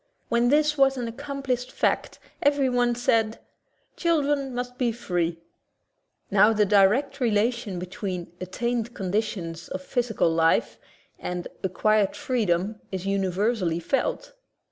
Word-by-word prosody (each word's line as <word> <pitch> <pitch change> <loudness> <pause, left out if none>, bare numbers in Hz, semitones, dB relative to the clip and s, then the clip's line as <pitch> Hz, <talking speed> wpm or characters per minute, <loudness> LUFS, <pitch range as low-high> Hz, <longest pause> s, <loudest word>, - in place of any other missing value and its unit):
When 235 +1 +3
this 300 +1 +3
was 270 -1 +4
an 245 -2 -2
ac 230 - -8
complished 275 -3 -3
fact - - 0 0.2
everyone 255 -4 +2
said: 225 -2 +1 0.6
"Children 290 -5 +1
must 250 +1 -5
be 245 -2 +2
free/' 175 -7 -2 0.9
Now 210 +3 +6
the 210 -1 +3
direct 215 +8 +3
relation 225 -3 0
be 180 - -4
tween 185 -2 -5
"attained 235 +5 -2
conditions 185 -4 -3
of 185 - -5
physical 235 -7 0
life" 165 0 +2 0.4
and 180 -1 -4
"acquired 205 +2 +2
freedom" 210 -4 -1
is 190 -1 -4
universally 195 -2 0
felt. - - -1
225 Hz, 120 wpm, -25 LUFS, 190-250 Hz, 0.9 s, Now